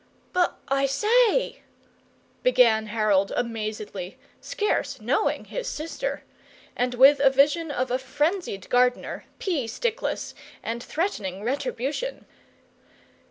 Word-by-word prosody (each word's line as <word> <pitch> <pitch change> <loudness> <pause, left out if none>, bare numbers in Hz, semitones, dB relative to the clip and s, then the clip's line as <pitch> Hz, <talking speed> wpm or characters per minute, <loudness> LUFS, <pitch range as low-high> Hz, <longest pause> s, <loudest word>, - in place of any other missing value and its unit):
"But 360 -1 +1
I 275 0 +2
say, 455 - +2 0.4
" - - -36
began 230 - +4
Harold, 210 -3 +2
amazedly, 215 -5 -4 0.2
scarce 430 -4 -1
knowing - - 0
his - - -5
sister, 330 +11 -4 0.5
and 245 0 0
with 275 +3 +7
a 275 -1 +6
vision 290 +5 +3
of 255 -3 -2
a 255 - +1
frenzied 290 - -2
gardener, 250 0 +1
pea 315 - -1
stickless 455 - -2 0.3
and 230 +1 -3
threatening 210 - -3
retribution. 280 - -3
270 Hz, 110 wpm, -25 LUFS, 230-345 Hz, 0.5 s, with